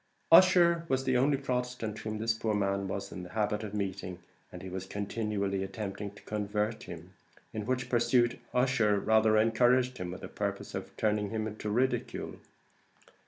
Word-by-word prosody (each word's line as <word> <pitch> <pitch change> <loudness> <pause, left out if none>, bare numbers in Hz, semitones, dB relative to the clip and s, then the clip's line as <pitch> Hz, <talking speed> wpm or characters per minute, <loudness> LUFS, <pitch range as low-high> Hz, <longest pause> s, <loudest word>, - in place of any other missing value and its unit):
Ussher 170 -1 +7
was 130 0 +1
the 130 -1 +1
only 135 +3 +3
Protestant 125 -5 -3
whom 110 0 -4
this 110 +1 +1
poor 110 -1 -1
man 100 -1 0
was 95 +1 -4
in 90 - -6
the 90 - -9
habit 105 0 0
of 105 -1 -5
meeting, 95 -2 -3 0.3
and - - -9
he - - -6
was 95 0 -5
continually 100 -1 -2
attempting 100 0 -5
to - - -15
convert 105 +1 -2
him; 85 +2 -10 0.4
in 110 0 -4
which 125 0 -1
pursuit 120 0 +2
Ussher 125 -5 +2
rather 110 +1 +4
encouraged 125 +3 +3
him 90 -1 -4
with 90 - -7
the - - -6
purpose - - -4
of - - -6
turning 105 -1 +1
him 110 0 -2
into 110 0 -5
ridicule. 125 +5 -1
110 Hz, 170 wpm, -30 LUFS, 100-125 Hz, 0.4 s, Ussher